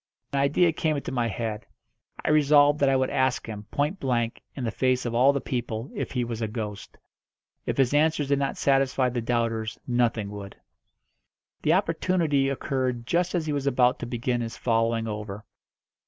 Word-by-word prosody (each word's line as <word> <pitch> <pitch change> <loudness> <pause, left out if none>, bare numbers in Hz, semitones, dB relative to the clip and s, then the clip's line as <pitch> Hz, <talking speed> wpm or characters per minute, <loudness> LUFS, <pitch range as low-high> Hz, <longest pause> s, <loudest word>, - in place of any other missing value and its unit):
An 140 - +1
idea 150 +5 +3
came 155 0 0
into 140 - -5
my 120 -3 0
head. 110 -1 -4 0.6
I - - +3
resolved 145 -1 +5
that 140 - +4
I 135 - +3
would 130 0 +1
ask 130 -1 +1
him, 105 -2 -7
point 150 +7 -1
blank, 120 -5 -1
in 135 - -5
the 115 - -1
face 130 +2 +1
of 120 - -2
all 125 +4 +5
the 140 - -1
people, 120 -2 -4
if - - -4
he 125 -2 0
was 115 -1 -4
a 110 - 0
ghost. 105 -2 -6 0.7
If - - -1
his 135 -1 +3
answers 150 -1 +2
did 140 -1 +2
not 140 -1 -1
satisfy 135 -2 +2
the 120 -1 -2
doubters 115 -2 -1
nothing 120 -4 0
would. 100 -1 -8 1.1
The 155 - +3
opportunity 165 -6 +1
occurred 130 -3 -2
just 175 +6 0
as 165 -3 0
he 150 - -1
was 140 -1 -2
about 125 -2 +3
to 120 - -5
begin 120 0 -1
his 115 -1 -5
following 115 -1 +1
over. 105 -1 -6
125 Hz, 185 wpm, -26 LUFS, 115-140 Hz, 1.1 s, resolved